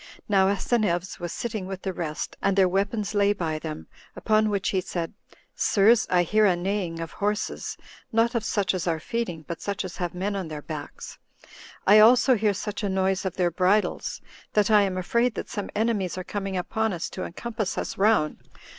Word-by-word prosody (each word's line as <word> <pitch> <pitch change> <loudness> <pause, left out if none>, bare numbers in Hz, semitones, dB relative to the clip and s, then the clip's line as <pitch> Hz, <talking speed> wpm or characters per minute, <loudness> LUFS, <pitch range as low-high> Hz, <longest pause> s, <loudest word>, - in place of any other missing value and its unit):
Now 195 -2 +4
Asineus 195 -3 0
was 175 -1 -4
sitting 215 -5 -4
with 190 -1 -6
the 190 - -2
rest, 160 -3 -4
and 195 0 +1
their 190 -1 +6
weapons 200 +3 -1
lay 205 0 +3
by 160 -5 -2
them; 155 -1 -6 0.3
upon 215 0 +2
which 200 -2 0
he 190 - +1
said, 175 -2 -4 0.4
"Sirs, 220 +3 +4
I 180 -1 +4
hear 215 +4 +3
a 185 - +3
neighing 175 -2 -2
of 165 -1 -5
horses; 210 +1 -2 0.3
not 230 +2 +2
of 235 -3 0
such 200 -4 0
as 180 -2 -3
are 165 -2 0
feeding, 175 -5 -4
but 170 - -5
such 200 -1 -3
as 180 - -7
have 175 -2 -3
men 200 +3 -2
on 190 -4 -3
their 150 -2 -7
backs; 150 -2 -8 0.7
I 210 +2 +8
also 245 +4 +7
hear 210 -3 +1
such 210 +2 -4
a 205 - -1
noise 190 0 0
of 190 - -2
their 175 -2 +1
bridles, 190 +5 +1 0.3
that 210 0 +3
I 210 -1 +7
am 190 -2 0
afraid 235 +6 +1
that - - -5
some 205 -3 -4
enemies 205 -5 0
are 185 - -3
coming 195 0 -3
upon 220 +3 -1
us 175 0 -3
to 185 - -5
encompass 215 +2 -4
us - - -3
round. 195 -7 +2
195 Hz, 200 wpm, -26 LUFS, 180-215 Hz, 0.7 s, I